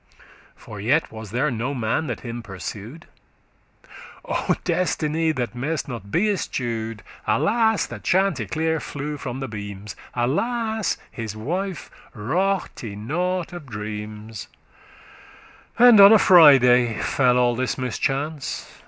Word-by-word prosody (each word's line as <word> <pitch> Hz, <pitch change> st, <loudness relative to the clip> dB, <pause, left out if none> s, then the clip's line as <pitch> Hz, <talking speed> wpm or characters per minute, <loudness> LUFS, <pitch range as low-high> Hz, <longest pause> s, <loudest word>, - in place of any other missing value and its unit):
For 105 Hz, -, -11 dB
yet 145 Hz, +10 st, +1 dB
was 110 Hz, -2 st, -9 dB
there 130 Hz, +8 st, 0 dB
no 125 Hz, +4 st, -3 dB
man 125 Hz, +6 st, -1 dB
that 120 Hz, -, -4 dB
him 120 Hz, -1 st, -6 dB
pursu'd. 105 Hz, -, -8 dB, 1.2 s
O -, -, 0 dB
destiny, 160 Hz, -2 st, 0 dB
that 120 Hz, -7 st, -3 dB
may'st 145 Hz, +6 st, -3 dB
not 115 Hz, -7 st, -7 dB
be 185 Hz, -, +1 dB
eschew'd!* 115 Hz, -, -3 dB
*escaped -, -, -20 dB
Alas, 220 Hz, 0 st, +2 dB
that -, -, -9 dB
Chanticleer 160 Hz, -, 0 dB
flew 150 Hz, +1 st, -5 dB
from 130 Hz, -1 st, -6 dB
the 135 Hz, -, -3 dB
beams! 105 Hz, -2 st, -7 dB, 0.2 s
Alas, 220 Hz, -, -1 dB
his 110 Hz, -2 st, -6 dB
wife 175 Hz, -, -4 dB, 0.2 s
raughte* 145 Hz, -, -2 dB
nought 180 Hz, -, -2 dB
of 170 Hz, -5 st, -9 dB
dreams! 105 Hz, 0 st, -7 dB, 1.3 s
*regarded 245 Hz, +1 st, +7 dB
And 220 Hz, -, +7 dB
on 200 Hz, +1 st, +10 dB
a 220 Hz, -, +8 dB
Friday 125 Hz, -, +6 dB
fell 125 Hz, -2 st, +2 dB
all 120 Hz, -1 st, +3 dB
this 130 Hz, +1 st, -2 dB
mischance. 135 Hz, +3 st, -2 dB
130 Hz, 125 wpm, -23 LUFS, 115-165 Hz, 1.3 s, on